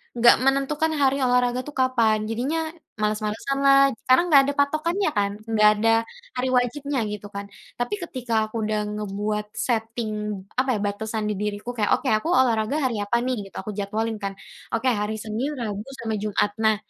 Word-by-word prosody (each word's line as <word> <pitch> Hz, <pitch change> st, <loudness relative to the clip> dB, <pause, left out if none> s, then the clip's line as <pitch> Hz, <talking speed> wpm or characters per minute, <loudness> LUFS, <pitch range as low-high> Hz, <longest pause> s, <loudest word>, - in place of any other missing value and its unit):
nggak 235 Hz, 0 st, +7 dB
menentukan 285 Hz, +4 st, +1 dB
hari 270 Hz, 0 st, +4 dB
olahraga 250 Hz, 0 st, +2 dB
tuh 295 Hz, -, -8 dB
kapan. 230 Hz, -4 st, +3 dB
Jadinya, 270 Hz, +8 st, -1 dB, 0.4 s
males-malesanlah, 275 Hz, +6 st, +3 dB, 0.2 s
karena 255 Hz, +6 st, +6 dB
nggak 280 Hz, -2 st, +9 dB
ada 285 Hz, -, 0 dB
patokannya, 310 Hz, +6 st, +1 dB
kan? 200 Hz, 0 st, +2 dB, 0.2 s
Nggak 215 Hz, -1 st, +6 dB
ada 225 Hz, +1 st, +3 dB, 0.5 s
hari 250 Hz, +1 st, -1 dB
wajibnya, 275 Hz, +2 st, -1 dB
gitu 205 Hz, 0 st, -6 dB
kan. 200 Hz, 0 st, -4 dB, 0.3 s
Tapi, 330 Hz, +12 st, -1 dB
ketika 250 Hz, -7 st, -5 dB
aku 215 Hz, -, -14 dB
udah 215 Hz, 0 st, 0 dB, 0.2 s
ngebuat 210 Hz, +1 st, -2 dB
setting, 225 Hz, -1 st, -1 dB, 0.5 s
apa 255 Hz, -1 st, +2 dB
ya, 210 Hz, -, -2 dB
batasan 220 Hz, +1 st, -3 dB
di -, -, 0 dB
diriku 210 Hz, +3 st, -3 dB
kayak, 220 Hz, -4 st, -1 dB
"Oke, 275 Hz, -, -5 dB
aku 215 Hz, +8 st, +1 dB
olahraga 235 Hz, -1 st, +2 dB
hari 235 Hz, -5 st, 0 dB
apa 235 Hz, +4 st, 0 dB
nih? 255 Hz, 0 st, 0 dB
Gitu. -, -, -19 dB
Aku 210 Hz, +2 st, -5 dB
jadwalin, 215 Hz, +2 st, -2 dB
kan, 195 Hz, -1 st, -4 dB, 0.4 s
"Oke, 255 Hz, +3 st, +2 dB
hari 210 Hz, 0 st, -1 dB
Senin, 225 Hz, +7 st, -3 dB
Rabu, 215 Hz, -2 st, -4 dB, 0.2 s
sama 220 Hz, -2 st, -2 dB
Jumat." 205 Hz, 0 st, 0 dB
Nah, 220 Hz, -1 st, +4 dB
230 Hz, 170 wpm, -24 LUFS, 210-260 Hz, 0.5 s, nggak